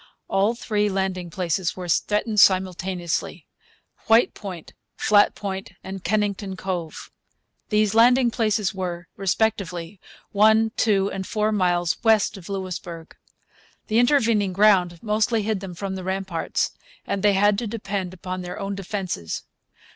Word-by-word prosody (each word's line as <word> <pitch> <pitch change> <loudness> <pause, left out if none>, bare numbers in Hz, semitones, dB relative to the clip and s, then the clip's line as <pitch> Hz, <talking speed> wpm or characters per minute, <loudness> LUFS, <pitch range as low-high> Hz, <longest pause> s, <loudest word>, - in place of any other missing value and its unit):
All 205 +4 +1
three 210 -3 0
landing 190 -2 -2
places 175 +1 -2
were 180 -1 -5
threatened 210 +5 +1
simultaneously, 185 -2 +1 0.6
White 225 +2 +5
Point, 185 -6 -8 0.2
Flat 205 -1 +4
Point, 195 -1 -5
and 190 -1 -7
Kennington 200 -1 -1
Cove. 175 -5 -5 0.6
These 210 -1 +2
landing 240 +2 +5
places 215 -3 0
were, 180 -2 -5
respectively, 195 -3 -1 0.3
one, 220 +2 +4
two, 200 -3 +2
and 190 -1 -5
four 215 -1 0
miles 175 -4 +1
west 220 -2 +3
of 195 -1 -11
Louisbourg. 180 -4 -6 0.7
The 220 +2 +3
intervening 230 -7 +3
ground 185 -3 +4
mostly 220 +1 +1
hid 215 -1 -1
them 185 -2 -8
from 195 +2 -4
the 190 -1 -5
ramparts, 190 -2 -2 0.3
and 200 - -2
they 205 0 +4
had 205 +1 +3
to 235 - -3
depend 200 -4 -4
upon 185 0 -6
their 180 0 -6
own 200 0 -3
defences. 190 - -4
195 Hz, 135 wpm, -23 LUFS, 185-215 Hz, 0.7 s, White